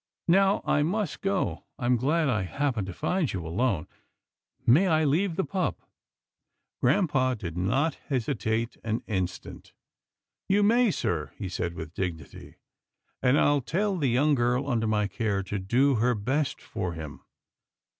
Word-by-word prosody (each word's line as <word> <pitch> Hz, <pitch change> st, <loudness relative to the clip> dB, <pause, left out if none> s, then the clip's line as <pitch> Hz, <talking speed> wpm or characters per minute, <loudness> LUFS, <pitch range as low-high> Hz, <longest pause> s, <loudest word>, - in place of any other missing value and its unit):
Now, 195 Hz, +3 st, +4 dB
I 145 Hz, -, +2 dB
must 195 Hz, +7 st, -1 dB
go. 195 Hz, -1 st, -1 dB
I 125 Hz, -, -4 dB
am 125 Hz, +1 st, +4 dB
glad 150 Hz, +6 st, +1 dB
I 110 Hz, -7 st, +1 dB
happened 115 Hz, +1 st, -1 dB
to -, -, -4 dB
find 180 Hz, -, -1 dB
you 90 Hz, -4 st, -4 dB
alone. 95 Hz, 0 st, 0 dB, 0.8 s
May 155 Hz, +11 st, +5 dB
I 160 Hz, -3 st, +3 dB
leave 165 Hz, +5 st, +1 dB
the 190 Hz, -, 0 dB
pup? 185 Hz, -2 st, -2 dB, 0.5 s
" -, -, -56 dB
Grampa 130 Hz, -3 st, +2 dB
did 85 Hz, -6 st, -6 dB
not 130 Hz, -, 0 dB
hesitate 115 Hz, -3 st, -1 dB
an 115 Hz, 0 st, -2 dB
instant. 95 Hz, -4 st, -4 dB, 0.4 s
" -, -, -60 dB
You 205 Hz, +2 st, +4 dB
may, 235 Hz, +3 st, +4 dB
sir," -, -, -2 dB
he 95 Hz, -, -4 dB
said 85 Hz, -1 st, -3 dB
with 80 Hz, 0 st, -7 dB
dignity, 85 Hz, -7 st, -6 dB, 0.3 s
" -, -, -49 dB
and 125 Hz, +3 st, +4 dB
I'll 145 Hz, -1 st, +3 dB
tell 195 Hz, -, 0 dB
the 150 Hz, -6 st, 0 dB
young 140 Hz, +6 st, +3 dB
girl 125 Hz, +1 st, +1 dB
under 115 Hz, -4 st, 0 dB
my 105 Hz, -1 st, +1 dB
care 100 Hz, -1 st, -1 dB
to 100 Hz, +2 st, -3 dB
do 125 Hz, +9 st, +2 dB
her 125 Hz, +1 st, +3 dB
best 135 Hz, +7 st, -1 dB
for 90 Hz, -6 st, -4 dB
him. 80 Hz, -3 st, -8 dB
125 Hz, 165 wpm, -27 LUFS, 100-155 Hz, 0.8 s, May